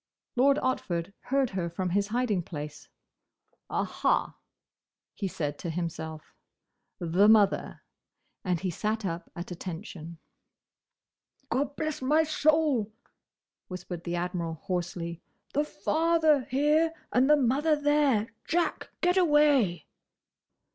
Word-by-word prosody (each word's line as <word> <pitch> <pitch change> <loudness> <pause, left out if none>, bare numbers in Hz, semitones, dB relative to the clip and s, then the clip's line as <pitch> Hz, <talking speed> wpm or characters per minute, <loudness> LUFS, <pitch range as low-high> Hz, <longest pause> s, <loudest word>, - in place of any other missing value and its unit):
Lord 275 +3 +4
Otford 190 -8 -1
heard 270 -1 +1
her 180 -3 -2
from 180 +1 -3
his 200 +2 +1
hiding 220 -4 0
place. 150 -3 -8 0.8
"Aha!" - - 0 0.8
he 200 - -3
said 150 -5 -4
to 170 - -4
himself, 160 -2 -5 0.6
"the 180 +3 +3
mother!" 210 -3 +3 0.6
and 180 -3 0
he 185 0 -2
sat 215 +4 -2
up 170 -1 -4
at 175 +1 -7
attention. 170 -1 -7 1.3
"Gobblessmysoul!" 300 -1 +1 0.8
whispered 180 -2 -7
the 175 0 -3
Admiral, 175 -2 -2
hoarsely. 170 -2 -3 0.3
"The 295 +2 +1
father 315 -3 +2
here, 300 +5 +2 0.2
and 255 +3 +4
the 300 - +7
mother 285 +4 +2
there! 290 -7 +2 0.2
Jack! 340 +1 0
Get 360 +1 +3
away!" 295 - +4
210 Hz, 105 wpm, -28 LUFS, 175-290 Hz, 1.3 s, the